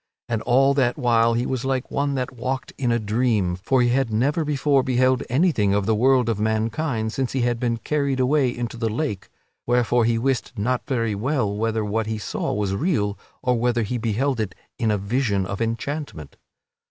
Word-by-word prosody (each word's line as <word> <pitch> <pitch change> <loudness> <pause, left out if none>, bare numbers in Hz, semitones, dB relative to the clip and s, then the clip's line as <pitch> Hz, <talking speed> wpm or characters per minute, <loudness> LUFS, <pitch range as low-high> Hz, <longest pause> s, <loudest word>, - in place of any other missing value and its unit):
And 115 -2 -1
all 135 +4 +4
that 130 -3 +1
while 115 -1 +3
he 120 +1 0
was 130 -2 -2
like 130 -1 -2
one 140 0 0
that 130 -1 -2
walked 130 +2 -4
in 125 -3 0
a 115 - +3
dream, 110 -4 0
for 125 +8 +1
he 120 - +3
had 130 -1 +1
never 140 +9 +1
before 145 -2 +2
beheld 130 0 +2
anything 125 - +2
of 100 -1 0
the 110 - +2
world 125 +2 +3
of 115 -3 0
mankind 110 +2 -1
since 130 -2 -2
he 135 - 0
had 120 -1 0
been 115 -1 0
carried 140 +1 -1
away 130 +1 +3
into 120 -1 -4
the 115 -1 -1
lake, 110 -3 -3 0.4
wherefore 120 -1 +2
he 115 0 +2
wist 130 +2 -1
not 125 +5 -1
very 115 -5 0
well 110 -1 -1
whether 110 0 -1
what 110 +1 -1
he 110 0 -2
saw 105 - -3
was 100 -1 -1
real 105 - 0 0.3
or 125 -2 +1
whether 120 -1 +1
he 120 +3 -3
beheld 115 +4 0
it 105 -4 -3 0.2
in 115 -3 +1
a 105 - +2
vision 100 -1 0
of 95 +2 -5
enchantment. 115 - -4
120 Hz, 200 wpm, -23 LUFS, 110-130 Hz, 0.4 s, all